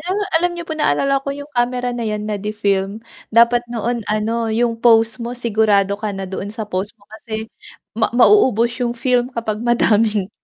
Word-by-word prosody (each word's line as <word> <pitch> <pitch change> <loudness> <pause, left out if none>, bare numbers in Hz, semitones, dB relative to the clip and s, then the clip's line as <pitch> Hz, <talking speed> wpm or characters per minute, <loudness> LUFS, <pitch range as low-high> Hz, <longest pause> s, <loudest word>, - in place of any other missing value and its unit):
ba, 405 +2 0 0.2
alam 355 +1 +1
niyo 340 - -6
po 325 - -6
naalala 275 -2 +1
ko 275 - -7
yung 285 +1 -9
kamera 245 0 0
na 240 -2 -3
yan 210 -1 -3
na 210 -1 -3
de 210 +2 -4
film, 200 +1 -1 0.3
dapat 235 +1 +5
noon 240 0 -2
ano 225 +2 -1
yung 230 +1 0
post 230 0 +4
mo 235 +1 -4
sigurado 210 -4 +1
ka 215 -1 -2
na 195 - -4
doon 190 +1 -5
sa 220 -1 -4
post 200 +1 -4
mo 200 - -26
kasi 220 0 -7 0.5
ma 225 - +2
mauubos 240 - +4
yung 240 -1 -1
film 250 0 +1
kapag 220 -2 -3
madaming 220 -4 +2
230 Hz, 190 wpm, -19 LUFS, 210-245 Hz, 0.5 s, dapat